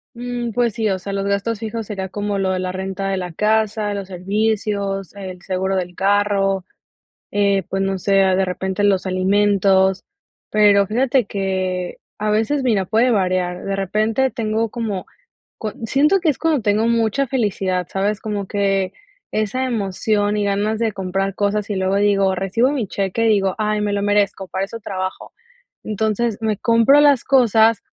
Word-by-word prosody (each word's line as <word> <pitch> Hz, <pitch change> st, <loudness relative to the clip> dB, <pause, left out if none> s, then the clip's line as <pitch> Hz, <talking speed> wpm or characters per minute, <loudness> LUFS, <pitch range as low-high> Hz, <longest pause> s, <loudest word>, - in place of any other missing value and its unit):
Mm, 240 Hz, -1 st, -4 dB
pues 235 Hz, -2 st, +1 dB
sí, 220 Hz, -2 st, -1 dB
o 190 Hz, -, 0 dB
sea, 200 Hz, +2 st, -6 dB
los 195 Hz, 0 st, -2 dB
gastos 200 Hz, +2 st, -1 dB
fijos 225 Hz, 0 st, -4 dB
sería 190 Hz, -3 st, -4 dB
como 205 Hz, 0 st, -2 dB
lo 190 Hz, -1 st, 0 dB
de 185 Hz, -, -1 dB
la 185 Hz, 0 st, -2 dB
renta 190 Hz, +1 st, -4 dB
de 195 Hz, -, -1 dB
la 180 Hz, -2 st, -5 dB
casa, 215 Hz, +1 st, +1 dB
los 200 Hz, -2 st, -5 dB
servicios, 200 Hz, 0 st, -2 dB
el 185 Hz, -2 st, -8 dB
seguro 190 Hz, +1 st, -1 dB
del 180 Hz, -1 st, -3 dB
carro, 195 Hz, -1 st, +1 dB, 0.7 s
eh, 200 Hz, -1 st, +2 dB
pues 195 Hz, 0 st, -1 dB
no 195 Hz, -1 st, -1 dB
sé, 195 Hz, +1 st, +3 dB
ah, 190 Hz, -1 st, +3 dB
de 190 Hz, -, +2 dB
repente 190 Hz, +2 st, -2 dB
los 195 Hz, -2 st, +2 dB
alimentos, 190 Hz, 0 st, +2 dB, 0.5 s
pero 205 Hz, -2 st, +4 dB
fíjate 250 Hz, +4 st, +2 dB
que 185 Hz, -2 st, -2 dB, 0.2 s
a 210 Hz, 0 st, -1 dB
veces, 225 Hz, +7 st, +1 dB
mira, 220 Hz, -7 st, +1 dB
puede 230 Hz, +6 st, +2 dB
variar, 185 Hz, -3 st, 0 dB
de 195 Hz, 0 st, -2 dB
repente 215 Hz, +7 st, 0 dB
tengo 225 Hz, -2 st, -1 dB
como 215 Hz, -6 st, -4 dB, 0.5 s
co 215 Hz, -, -4 dB
siento 300 Hz, -, +3 dB
que 335 Hz, -3 st, +1 dB
es 280 Hz, -, 0 dB
cuando 320 Hz, -5 st, +1 dB
tengo 210 Hz, +2 st, +1 dB
mucha 230 Hz, +3 st, +1 dB
felicidad, 195 Hz, -8 st, -1 dB
¿sabes? 200 Hz, +2 st, -1 dB
Como 205 Hz, -2 st, -3 dB
que 195 Hz, -2 st, 0 dB, 0.4 s
esa 215 Hz, +5 st, -1 dB
emoción 210 Hz, -2 st, 0 dB
y 205 Hz, -, 0 dB
ganas 205 Hz, +2 st, 0 dB
de 225 Hz, -2 st, +1 dB
comprar 195 Hz, 0 st, -2 dB
cosas 205 Hz, +1 st, -1 dB
y 205 Hz, -, -1 dB
luego 190 Hz, +1 st, 0 dB
digo 200 Hz, -1 st, +3 dB
recibo 195 Hz, +8 st, +1 dB
mi 255 Hz, -8 st, -2 dB
cheque 195 Hz, +4 st, -1 dB
y 225 Hz, -, +4 dB
digo: 195 Hz, -3 st, +2 dB
"Ay 215 Hz, -1 st, 0 dB
me 205 Hz, -1 st, -1 dB
lo 200 Hz, -, 0 dB
merezco, 205 Hz, -2 st, +1 dB
para 190 Hz, +1 st, -2 dB
eso 230 Hz, +3 st, -8 dB
trabajo". 185 Hz, -2 st, -5 dB, 0.5 s
Entonces 215 Hz, +1 st, -1 dB
me 215 Hz, -2 st, 0 dB
compro 230 Hz, +5 st, +4 dB
las 285 Hz, -4 st, +5 dB
cosas 230 Hz, -4 st, +4 dB
205 Hz, 175 wpm, -20 LUFS, 195-220 Hz, 0.7 s, las